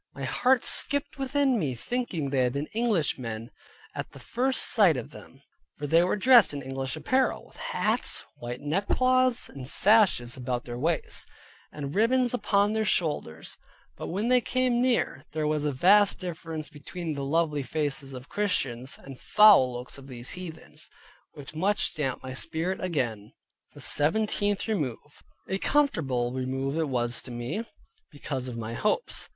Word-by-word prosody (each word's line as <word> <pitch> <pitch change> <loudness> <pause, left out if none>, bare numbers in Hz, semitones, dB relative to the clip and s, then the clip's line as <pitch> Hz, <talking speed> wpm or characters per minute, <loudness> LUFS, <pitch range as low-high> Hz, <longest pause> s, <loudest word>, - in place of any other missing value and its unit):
My - - -7
heart 255 -1 +2
skipped 285 0 +1
within 270 -2 +1
me, 140 -8 -2
thinking 170 - -3
they 135 - +1
had 125 -1 +2
been 140 +2 -3
Englishmen 140 - -1 0.4
at - - -6
the - - -12
first 260 +2 0
sight 190 - +5
of 125 - -6
them, - - -14 0.3
for 145 - -5
they 165 +4 +4
were 180 - +1
dressed 230 - +6
in 140 - -5
English 135 +1 -4
apparel, 255 - 0
with - - -20
hats, - - -1
white 120 +1 -6
neckcloths, 255 - +2
and 130 -2 -6
sashes 190 - +4
about 125 -1 -3
their 120 0 -6
waists; 160 +3 -1 0.4
and 145 -1 -6
ribbons 245 +4 +2
upon 205 -3 +2
their 220 0 +1
shoulders; 150 - -2 0.4
but - - -7
when 205 +6 -2
they 250 0 +4
came 250 -1 +1
near, 240 - 0
there 155 0 -1
was 150 -1 0
a 150 - +1
vast 195 +9 +5
difference 165 -3 -5
between 160 +3 -6
the 140 -1 -4
lovely 150 0 0
faces 140 0 -3
of 130 +1 -9
Christians, 135 - -1
and 135 -2 -12
foul 210 -12 +6
looks 125 +3 -7
of 135 - -13
those 125 -2 -7
heathens, 160 -4 -9 0.4
which 145 -1 -10
much 200 +7 0
damped 145 -6 -3
my 130 0 -6
spirit 165 +7 -3
again. 120 - -2 0.4
THE 145 - -11
SEVENTEENTH 205 - +1
REMOVE 150 - -4 0.3
A 190 - -2
comfortable 140 - +1
remove 135 +2 -2
it 160 -2 -1
was 120 -2 0
to - - -10
me, 125 - -4 0.5
because 135 -3 -5
of 120 -2 -6
my 115 0 -5
hopes. 210 - -1
155 Hz, 160 wpm, -27 LUFS, 130-210 Hz, 0.5 s, dressed